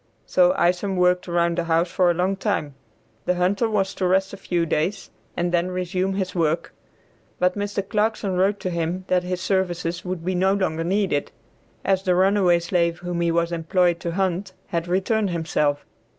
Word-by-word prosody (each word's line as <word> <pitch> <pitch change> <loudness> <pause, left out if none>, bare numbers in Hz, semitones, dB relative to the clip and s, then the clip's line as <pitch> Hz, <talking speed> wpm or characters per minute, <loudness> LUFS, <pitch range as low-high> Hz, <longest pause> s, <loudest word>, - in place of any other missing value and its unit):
So 180 -1 +4
Isom 180 +3 +1
worked 180 0 +2
around 170 0 +1
the 170 - -1
house 170 +1 +1
for 180 -1 +3
a 175 - +2
long 185 +3 +1
time. 190 -8 -2 0.5
The 180 - +2
hunter 195 +6 +1
was 195 -2 0
to 185 - -1
rest 190 +2 +1
a - - -6
few 175 -3 -1
days, 165 +6 -2 0.3
and 175 0 0
then 175 +1 +1
resume 185 +1 -1
his 190 -2 -2
work, 165 -1 0 0.6
but 180 0 +2
Mr. 205 -1 -3
Clarkson 210 -2 0
wrote 195 +3 +2
to 185 - -2
him 170 +2 -2
that 180 -1 +3
his 180 0 -4
services 180 -2 -1
would 180 -2 -5
be 185 - 0
no 190 +2 +2
longer 165 -5 -1
needed, 185 -4 0 0.5
as 190 -1 +2
the 185 -2 +1
runaway 190 -1 +4
slave 170 -1 0
whom 175 -1 -2
he 170 - +2
was 170 0 +1
employed 170 +1 +1
to 170 -1 -4
hunt 190 0 -1 0.2
had 170 0 -2
returned 195 +3 +1
himself. 155 -4 0
180 Hz, 185 wpm, -23 LUFS, 170-190 Hz, 0.6 s, So